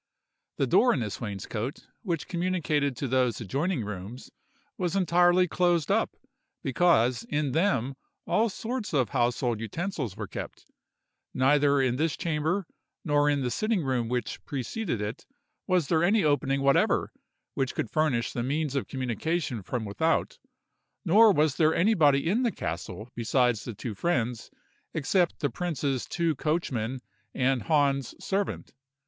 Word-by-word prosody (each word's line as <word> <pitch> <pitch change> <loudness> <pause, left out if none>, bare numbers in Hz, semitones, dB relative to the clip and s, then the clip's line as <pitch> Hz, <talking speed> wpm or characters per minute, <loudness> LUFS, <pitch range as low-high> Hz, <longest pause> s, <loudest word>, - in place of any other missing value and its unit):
The - - +2
door 250 - +4
in - - -1
this 105 -3 -4
wainscot, 105 +4 -5 0.2
which 170 -8 -3
communicated 165 -7 0
to 135 - -2
those 125 -2 +1
adjoining 135 - -1
rooms, 105 +4 -7 0.4
was 180 -6 -2
entirely 180 0 +4
closed 175 -3 +1
up, - - +1 0.5
because 130 -5 +3
in 145 -2 0
them 140 - +1 0.3
all 225 +2 +2
sorts 225 0 -4
of 130 -4 +2
household 120 -2 0
utensils 130 - -4
were - - -4
kept. - - -8 0.7
Neither 140 +2 +4
in 125 -1 +1
this 160 +1 0
chamber, 170 +3 -1 0.4
nor 145 -1 +3
in 145 -1 +1
the 125 - -1
sitting 215 - 0
room 125 -4 -1
which 125 -2 -3
preceded 140 - -3
it, 105 +3 -5 0.4
was 180 -6 +2
there 160 +1 +2
any 200 +3 +3
opening 140 -2 +1
whatever 140 0 +3 0.4
which 130 -1 -2
could 110 - -3
furnish 145 -7 +1
the 120 - -2
means 145 +3 -1
of 140 - -1
communication 130 - -2
from 110 +4 -4
without; 160 +11 0 0.7
nor 210 +5 +7
was 150 -5 +2
there 160 -1 +3
anybody 160 -8 +3
in 210 +8 +2
the 240 -3 +1
castle 105 - -5
besides 120 -1 +1
the 115 - -6
two 110 +2 -5
friends, 120 - -1 0.5
except 170 +4 +1
the 145 - 0
prince's 145 -7 -2
two 170 -2 0
coachmen 130 -6 -1 0.3
and 130 -1 +1
Hahn's 140 0 +1
servant. 195 0 -3
145 Hz, 145 wpm, -28 LUFS, 125-175 Hz, 0.7 s, nor